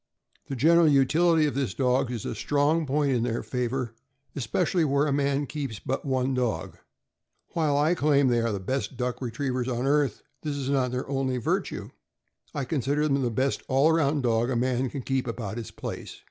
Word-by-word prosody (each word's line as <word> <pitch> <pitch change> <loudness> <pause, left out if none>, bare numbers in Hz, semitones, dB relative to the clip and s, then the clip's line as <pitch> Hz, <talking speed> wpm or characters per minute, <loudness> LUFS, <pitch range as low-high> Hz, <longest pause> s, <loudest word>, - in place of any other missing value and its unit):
The 135 - -4
general 165 +6 +5
utility 155 +3 +4
of 145 - 0
these 130 -8 -2
dogs 125 -1 +1
is 115 -4 -4
a - - -2
strong 145 +7 +1
point 145 +1 +1
in 125 -3 +1
their 120 0 -1
favor, 125 -1 -2 0.4
especially 140 - 0
where 140 -1 +2
a 145 - +1
man 140 0 +1
keeps 140 -6 -5
but 135 +7 -3
one 130 -1 0
dog. 115 -11 -2 0.7
While 150 -4 +1
I 150 +4 +3
claim 145 -4 +3
they 120 -2 +2
are 115 0 0
the 100 - -2
best 130 +6 -3
duck 125 0 -2
retrievers 125 +1 -2
on 125 0 -1
earth, 140 -4 +1 0.2
this 150 -2 -3
is 135 -1 -2
not 130 -2 +2
their 125 +1 -3
only 135 -2 -1
virtue; 120 - -2 0.6
I 140 - -3
consider 145 +2 0
them 140 -1 +1
the 125 - +1
best 130 +4 0
all 135 +4 +4
around 150 -3 +2
dog 115 0 +2
a 130 - 0
man 125 +1 0
can 135 0 -6
keep 135 0 -1
about 115 -2 -4
his 115 - -5
place. - - -7
135 Hz, 195 wpm, -27 LUFS, 125-145 Hz, 0.7 s, general